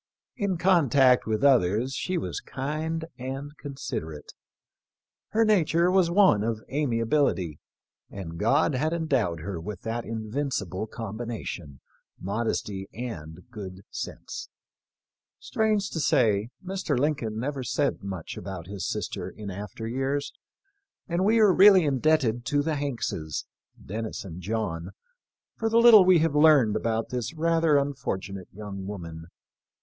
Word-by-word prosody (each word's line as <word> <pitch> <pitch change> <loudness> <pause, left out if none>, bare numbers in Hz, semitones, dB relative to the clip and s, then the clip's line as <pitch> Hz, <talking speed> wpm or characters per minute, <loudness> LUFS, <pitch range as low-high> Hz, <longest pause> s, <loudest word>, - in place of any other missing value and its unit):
In 200 -6 -1
contact 140 -9 +4
with 110 +3 -1
others 125 -1 +3
she 185 +5 -2
was - - -3
kind 155 +4 -3
and 135 +3 -5
considerate. 80 - -6 1.0
Her 225 +1 +3
nature 175 -4 +3
was 185 -2 +4
one 175 - +5
of 110 -1 -2
amiability, 115 - 0 0.5
and 85 -4 -7
God 140 +8 +3
had 155 +5 0
endowed 130 - 0
her 90 -1 -5
with 100 +1 -6
that 115 +1 -3
invincible 110 - -3
combination 110 - -6 0.2
— - - -44
modesty 100 -1 -2
and 90 -9 -7
good 95 -3 -8
sense. - - -6 0.9
Strange 215 -2 0
to 160 - -3
say, 110 -6 +2 0.2
Mr. 190 -7 -1
Lincoln 125 -6 0
never 135 +2 -3
said 135 +4 0
much 95 -4 -6
about 95 -3 -6
his 95 -2 -4
sister - - -4
in 105 -2 -8
after 105 +3 -6
years, 135 +4 -2 0.7
and 175 0 0
we 220 +3 +4
are 210 -4 +6
really 190 -2 +7
indebted 135 -4 +2
to 145 +4 +1
the 160 +1 0
Hankses 120 - -3 0.2
— - - -23
Dennis 110 +2 -5
and 90 -1 -8
John 95 -3 -3 0.3
— - - -67
for 225 - 0
the 225 - +3
little 230 -4 +9
we 185 -1 +6
have 160 -2 +2
learned 150 -8 +5
about 115 0 -1
this 125 +5 -3
rather 165 -1 +3
un 140 0 +1
fortunate 95 -7 -5
young 100 -1 -7
woman. 85 -5 -7
125 Hz, 140 wpm, -27 LUFS, 100-155 Hz, 1.0 s, little